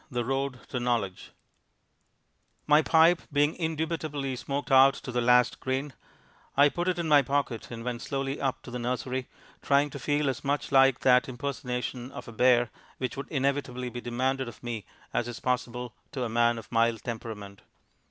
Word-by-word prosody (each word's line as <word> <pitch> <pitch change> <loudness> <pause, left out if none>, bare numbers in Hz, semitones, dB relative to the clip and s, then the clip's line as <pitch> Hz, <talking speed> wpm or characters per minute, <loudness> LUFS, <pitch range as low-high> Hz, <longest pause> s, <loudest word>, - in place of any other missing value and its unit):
The 120 -4 -2
Road 135 0 -2
to 125 - -2
Knowledge 115 -7 -1 1.4
My 150 +1 +6
pipe 165 +2 +5
being 145 +2 +3
indubitably 155 -4 -2
smoked 140 +3 -4
out 135 +1 +7
to 130 - -7
the 120 0 0
last 125 0 +4
grain, 130 +2 -2 0.6
I 145 +1 +7
put 175 +4 -3
it 180 -1 +1
in 170 -1 -2
my 150 -2 +6
pocket 135 -3 -2
and 115 -1 -7
went 120 -1 -3
slowly 135 0 -3
up 135 -2 -1
to - - -9
the 125 - -4
nursery, 125 +1 -2 0.3
trying 140 +1 +2
to 140 - -7
feel 145 +2 0
as 130 -2 -2
much 145 +1 -1
like 135 -1 +5
that 125 0 +4
impersonation 125 -1 -4
of 125 - -8
a - - -7
bear 120 0 +3 0.3
which 130 -1 -3
would 140 0 -6
inevitably 135 -3 -1
be 120 - -6
demanded 130 +2 -1
of 120 - -11
me 115 -5 -5 0.3
as 120 - 0
is 120 -1 -6
possible 125 -1 -2 0.2
to 130 - -2
a - - -1
man 120 +1 +2
of 115 - -10
mild 115 -2 +2
temperament. 105 -4 -6
130 Hz, 180 wpm, -28 LUFS, 120-140 Hz, 1.4 s, out